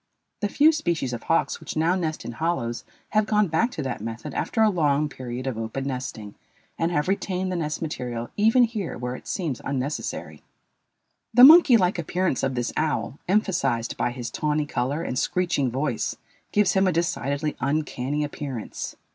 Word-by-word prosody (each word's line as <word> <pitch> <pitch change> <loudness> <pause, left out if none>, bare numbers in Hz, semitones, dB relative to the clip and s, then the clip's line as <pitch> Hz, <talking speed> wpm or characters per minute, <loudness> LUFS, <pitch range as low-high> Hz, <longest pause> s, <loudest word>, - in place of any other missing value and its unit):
The 205 - -1
few 300 +8 +5
species 170 - -1
of 120 - -4
hawks 165 - +1
which - - -6
now 165 +3 +3
nest 160 -4 -2
in - - -4
hollows 120 -4 -2 0.3
have 215 0 +2
gone 210 -1 +3
back 165 +10 +2
to 150 - -4
that 130 -5 -4
method 115 +1 -6
after 225 - +1
a 220 - +5
long 150 -4 +2
period 130 -2 -6
of 130 -4 -3
open 115 +4 -3
nesting 125 -6 -5 0.4
and 165 +1 0
have 150 -2 0
retained 190 -1 -1
the - - -1
nest 155 -1 -2
material 120 -6 -4
even 225 +4 +5
here 220 -6 -2
where 125 +1 -4
it - - -12
seems 160 - -3
unnecessary. 140 +2 -4 0.9
The 245 - +8
monkey 300 -4 +10
like 180 -3 +1
appearance 175 -2 0
of 135 -1 -1
this 120 -1 -2
owl, 155 -2 -1
emphasized 180 - +1
by - - 0
his 120 -1 -6
tawny 150 0 0
color 145 +3 -2
and 125 - -2
screeching 175 -7 0
voice, 130 -1 -1 0.4
gives 205 -2 +3
him 190 0 +3
a - - +3
decidedly 150 -3 -1
uncanny 145 0 -1
appearance. 140 -5 -5
150 Hz, 175 wpm, -25 LUFS, 130-185 Hz, 0.9 s, monkey